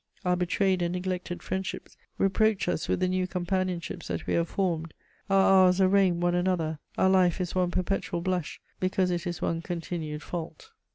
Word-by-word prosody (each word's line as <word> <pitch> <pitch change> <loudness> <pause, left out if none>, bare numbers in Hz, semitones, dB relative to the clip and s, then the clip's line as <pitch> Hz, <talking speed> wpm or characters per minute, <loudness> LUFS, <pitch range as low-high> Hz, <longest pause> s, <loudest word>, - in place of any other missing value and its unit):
Our 180 0 +3
betrayed 180 +1 +1
and 175 0 0
neglected 180 -1 -3
friendships 190 0 -4 0.2
reproach 210 +1 +2
us - - -1
with - - 0
the 185 - +3
new 185 0 0
companionships 180 -1 -2
that - - -4
we - - -1
have 170 0 +1
formed; 165 -4 -1 0.3
our 195 -1 +6
hours 180 +1 +2
arraign 190 -2 +4
one 175 0 +1
another: 175 -4 0 0.2
our - - +4
life 185 -2 +3
is 180 -1 -2
one 180 -1 +1
perpetual 180 -1 -1
blush, 180 -3 -2 0.2
because 185 0 +1
it 175 +1 -2
is 175 -1 -4
one 165 0 0
continued 165 -3 -4
fault. 175 - -7
180 Hz, 175 wpm, -28 LUFS, 175-190 Hz, 0.3 s, our